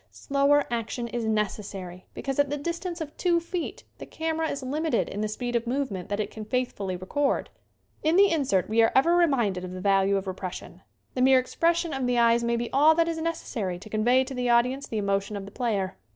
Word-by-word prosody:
Slower 280 Hz, 0 st, +2 dB
action 235 Hz, +1 st, -2 dB
is 235 Hz, 0 st, -3 dB
necessary 195 Hz, -4 st, -3 dB
because 270 Hz, 0 st, -3 dB
at 285 Hz, -1 st, +3 dB
the 290 Hz, -, -2 dB
distance 340 Hz, +3 st, -4 dB
of 300 Hz, -1 st, -6 dB
two 345 Hz, -2 st, +2 dB
feet 340 Hz, 0 st, -5 dB, 0.2 s
the -, -, -8 dB
camera 320 Hz, 0 st, -2 dB
is 280 Hz, -1 st, -4 dB
lim 295 Hz, +5 st, -2 dB
ited 320 Hz, -, +1 dB
in 205 Hz, -, -5 dB
the 215 Hz, -, 0 dB
speed 240 Hz, +3 st, -4 dB
of 235 Hz, 0 st, 0 dB
movement 240 Hz, -8 st, -2 dB
that 205 Hz, +1 st, -2 dB
it 210 Hz, -1 st, -2 dB
can 220 Hz, -, -7 dB
faith 250 Hz, +3 st, -1 dB
fully 190 Hz, -2 st, -4 dB
record. 270 Hz, +11 st, -1 dB, 0.5 s
In 315 Hz, +2 st, +2 dB
the 400 Hz, +1 st, +6 dB
insert 270 Hz, -, +1 dB
we 225 Hz, +2 st, +3 dB
are 225 Hz, -, +4 dB
ever 330 Hz, +6 st, +5 dB
reminded 240 Hz, -, +2 dB
of 185 Hz, 0 st, -6 dB
the 185 Hz, -, -6 dB
value 195 Hz, +1 st, +3 dB
of 195 Hz, -, -3 dB
repression. 185 Hz, -1 st, -6 dB, 0.3 s
The 255 Hz, -, -2 dB
mere 260 Hz, +1 st, +6 dB
expression 335 Hz, +5 st, +1 dB
of 265 Hz, -2 st, -1 dB
the 245 Hz, -1 st, +1 dB
eyes 235 Hz, 0 st, +4 dB
may 235 Hz, 0 st, +1 dB
be 235 Hz, 0 st, -3 dB
all 300 Hz, +4 st, +6 dB
that 335 Hz, 0 st, +2 dB
is 325 Hz, -1 st, -2 dB
necessary 240 Hz, -, -3 dB
to 210 Hz, +4 st, -12 dB
convey 245 Hz, +4 st, +3 dB
to 265 Hz, +1 st, -7 dB
the 250 Hz, -1 st, -1 dB
audience 250 Hz, +3 st, +2 dB
the 220 Hz, -, -4 dB
emotion 200 Hz, 0 st, -1 dB
of 195 Hz, -, -6 dB
the 200 Hz, -, -11 dB
player. 200 Hz, -6 st, -2 dB
245 Hz, 225 wpm, -26 LUFS, 205-290 Hz, 0.5 s, the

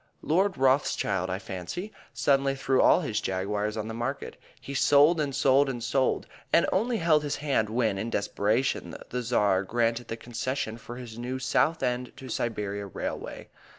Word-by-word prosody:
Lord 190 Hz, +4 st, +2 dB
Rothschild, 130 Hz, -8 st, +1 dB
I 95 Hz, -, -1 dB
fancy, 95 Hz, -, -6 dB, 0.2 s
suddenly 135 Hz, -1 st, +2 dB
threw 135 Hz, -1 st, +2 dB
all -, -, +5 dB
his 110 Hz, -9 st, -2 dB
Jaguars 105 Hz, +3 st, -2 dB
on 110 Hz, 0 st, -3 dB
the 110 Hz, -, -5 dB
market; 125 Hz, +5 st, -4 dB, 0.2 s
he 140 Hz, -, -8 dB
sold 145 Hz, +4 st, +5 dB
and 140 Hz, -3 st, -2 dB
sold 135 Hz, +1 st, +4 dB
and 120 Hz, -3 st, -4 dB
sold, 130 Hz, +1 st, +1 dB, 0.3 s
and 170 Hz, -, +5 dB
only 230 Hz, +5 st, +1 dB
held 165 Hz, -4 st, +3 dB
his 145 Hz, -1 st, -2 dB
hand 135 Hz, -8 st, 0 dB
when, 110 Hz, -4 st, 0 dB
in 110 Hz, +3 st, -3 dB
desperation, 110 Hz, +5 st, 0 dB, 0.2 s
the 125 Hz, -, -1 dB
Tsar 105 Hz, -6 st, +2 dB
granted 115 Hz, +3 st, 0 dB
the 115 Hz, -, -5 dB
concession 120 Hz, -1 st, -3 dB
for 120 Hz, -, -9 dB
his 120 Hz, -2 st, -9 dB
new 125 Hz, +2 st, -3 dB
Southend 125 Hz, -1 st, 0 dB
to 135 Hz, -2 st, -9 dB
Siberia 105 Hz, -4 st, -3 dB
railway. 95 Hz, -, -6 dB
125 Hz, 165 wpm, -27 LUFS, 110-140 Hz, 0.3 s, all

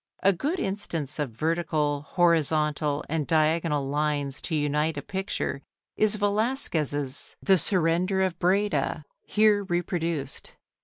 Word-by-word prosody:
A 195 Hz, -, +5 dB
good 300 Hz, -, -2 dB
instance 165 Hz, -7 st, -3 dB
of 145 Hz, -3 st, -1 dB
vertical, 155 Hz, +1 st, 0 dB
horizontal, 155 Hz, -3 st, +1 dB
and 155 Hz, -2 st, -2 dB
diagonal 155 Hz, -2 st, +2 dB
lines 145 Hz, -1 st, -1 dB
to 160 Hz, -, -2 dB
unite 150 Hz, +1 st, 0 dB
a -, -, -2 dB
picture 190 Hz, -7 st, -3 dB, 0.3 s
is 215 Hz, -1 st, +2 dB
Velazquez's 200 Hz, -, -1 dB
"The 190 Hz, -2 st, +4 dB
Surrender 180 Hz, +3 st, +2 dB
of 185 Hz, -2 st, -2 dB
Breda," 200 Hz, +4 st, +1 dB, 0.2 s
here 210 Hz, -1 st, +3 dB
reproduced. 170 Hz, -5 st, -2 dB
165 Hz, 115 wpm, -26 LUFS, 150-190 Hz, 0.3 s, A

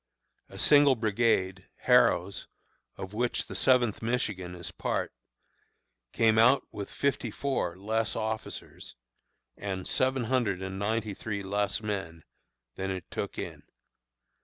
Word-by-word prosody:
A -, -, -11 dB
single 145 Hz, -2 st, +6 dB
brigade, 105 Hz, -4 st, +1 dB
Harrow's 115 Hz, -7 st, +3 dB, 0.5 s
(of 95 Hz, +1 st, -7 dB
which 120 Hz, +2 st, 0 dB
the -, -, -8 dB
Seventh 125 Hz, -5 st, +3 dB
Michigan 105 Hz, -7 st, -2 dB
is 85 Hz, -1 st, -7 dB
part), -, -, -2 dB, 1.0 s
came 110 Hz, -1 st, +3 dB
out 125 Hz, +5 st, +6 dB
with 100 Hz, -1 st, -6 dB
fifty 140 Hz, -4 st, -1 dB
four 105 Hz, -8 st, -2 dB
less 110 Hz, +3 st, -1 dB
officers, 110 Hz, 0 st, -5 dB, 0.6 s
and 95 Hz, -2 st, -3 dB
seven 130 Hz, -1 st, +1 dB
hundred 115 Hz, -6 st, 0 dB
and 95 Hz, 0 st, -5 dB
ninety 110 Hz, 0 st, -1 dB
three 100 Hz, 0 st, -4 dB
less 100 Hz, +2 st, 0 dB
men, 85 Hz, -6 st, -4 dB, 0.5 s
than 95 Hz, 0 st, -2 dB
it 95 Hz, -2 st, -5 dB
took -, -, -4 dB
in! -, -, -6 dB
110 Hz, 125 wpm, -29 LUFS, 95-120 Hz, 1.0 s, single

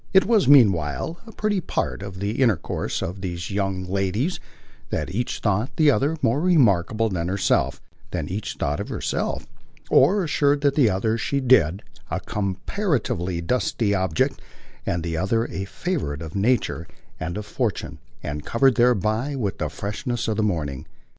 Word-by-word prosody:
It 190 Hz, -, +7 dB
was 220 Hz, -3 st, +3 dB
meanwhile 110 Hz, -, +4 dB
a -, -, -9 dB
pretty 210 Hz, -3 st, 0 dB
part 155 Hz, -, -2 dB
of 95 Hz, -2 st, -7 dB
the 105 Hz, +6 st, -2 dB
intercourse 115 Hz, -10 st, 0 dB
of 90 Hz, +3 st, -5 dB
these 85 Hz, -1 st, -4 dB
young 95 Hz, -2 st, -1 dB
ladies 100 Hz, -, -1 dB, 0.5 s
that -, -, -3 dB
each 120 Hz, +4 st, -1 dB
thought 105 Hz, +6 st, 0 dB
the 155 Hz, -2 st, +5 dB
other 140 Hz, +7 st, +1 dB
more 120 Hz, +6 st, +2 dB
remarkable 115 Hz, -, +3 dB
than 90 Hz, -5 st, -2 dB
herself 90 Hz, -8 st, +1 dB, 0.3 s
that -, -, -4 dB
each 105 Hz, +3 st, -4 dB
thought 75 Hz, +1 st, -1 dB
herself, -, -, -2 dB, 0.5 s
or 200 Hz, +1 st, +5 dB
assured 145 Hz, -3 st, +2 dB
the 140 Hz, -4 st, +4 dB
other 110 Hz, +4 st, 0 dB
she 140 Hz, +5 st, 0 dB
did, 105 Hz, -, +4 dB, 0.3 s
a -, -, -1 dB
comparatively 100 Hz, -, -2 dB
dusty 110 Hz, +1 st, 0 dB
object 95 Hz, -4 st, 0 dB, 0.5 s
and 85 Hz, -1 st, 0 dB
the 85 Hz, -1 st, -2 dB
other 115 Hz, +6 st, +1 dB
a 95 Hz, -, -4 dB
favourite 95 Hz, -, -3 dB
of 80 Hz, -, -8 dB
nature 100 Hz, -5 st, 0 dB, 0.3 s
and 85 Hz, +4 st, -3 dB
of 105 Hz, -, -5 dB
fortune -, -, -3 dB, 0.2 s
and 75 Hz, 0 st, -4 dB
covered 130 Hz, -, +3 dB
thereby 120 Hz, +3 st, +2 dB
with 105 Hz, -7 st, -2 dB
the 75 Hz, -, -1 dB
freshness 105 Hz, -, -3 dB
of 110 Hz, -, 0 dB
the 110 Hz, -, 0 dB
morning. 75 Hz, -10 st, -2 dB
105 Hz, 155 wpm, -24 LUFS, 90-130 Hz, 0.5 s, It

